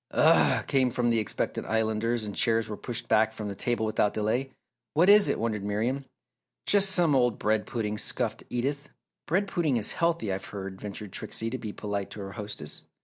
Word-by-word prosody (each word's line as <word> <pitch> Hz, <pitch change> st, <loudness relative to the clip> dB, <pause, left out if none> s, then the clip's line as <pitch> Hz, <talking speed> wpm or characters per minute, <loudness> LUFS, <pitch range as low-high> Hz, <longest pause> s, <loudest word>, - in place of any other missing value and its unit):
"Ugh!" -, -, +4 dB
came 130 Hz, -2 st, +2 dB
from 120 Hz, -1 st, +1 dB
expectant 110 Hz, -3 st, -1 dB
Islanders 110 Hz, +1 st, 0 dB
and 105 Hz, -, -6 dB
chairs 115 Hz, -1 st, +2 dB
were 105 Hz, -, -4 dB
pushed 120 Hz, +3 st, -4 dB
back 110 Hz, 0 st, +3 dB
from 105 Hz, -2 st, -5 dB
the -, -, -4 dB
table 120 Hz, +1 st, 0 dB
without 105 Hz, -1 st, +1 dB
delay. 110 Hz, +5 st, 0 dB, 0.5 s
"What 170 Hz, +5 st, +5 dB
is 205 Hz, 0 st, +7 dB
it?" -, -, +1 dB
wondered 110 Hz, -3 st, -2 dB
Miriam. 115 Hz, +7 st, -1 dB, 0.6 s
"Just 200 Hz, -1 st, +4 dB
some 175 Hz, -5 st, +3 dB
old 125 Hz, -4 st, +2 dB
bread 110 Hz, 0 st, 0 dB
pudding!" 105 Hz, -3 st, -2 dB
scoffed -, -, -1 dB
Edith. 140 Hz, +4 st, -2 dB, 0.4 s
"Bread 195 Hz, +5 st, +1 dB
pudding 165 Hz, -9 st, +1 dB
is 110 Hz, -, +1 dB
healthy, 165 Hz, -, 0 dB
I've 95 Hz, +1 st, -5 dB
heard," 95 Hz, -1 st, -7 dB
ventured 105 Hz, -1 st, -6 dB
Trixie 115 Hz, +4 st, -3 dB
to 130 Hz, -, -2 dB
be 110 Hz, -, -5 dB
polite 100 Hz, -1 st, -4 dB
to -, -, -9 dB
her 100 Hz, 0 st, -6 dB
hostess. 105 Hz, +1 st, -6 dB
110 Hz, 190 wpm, -28 LUFS, 105-130 Hz, 0.6 s, is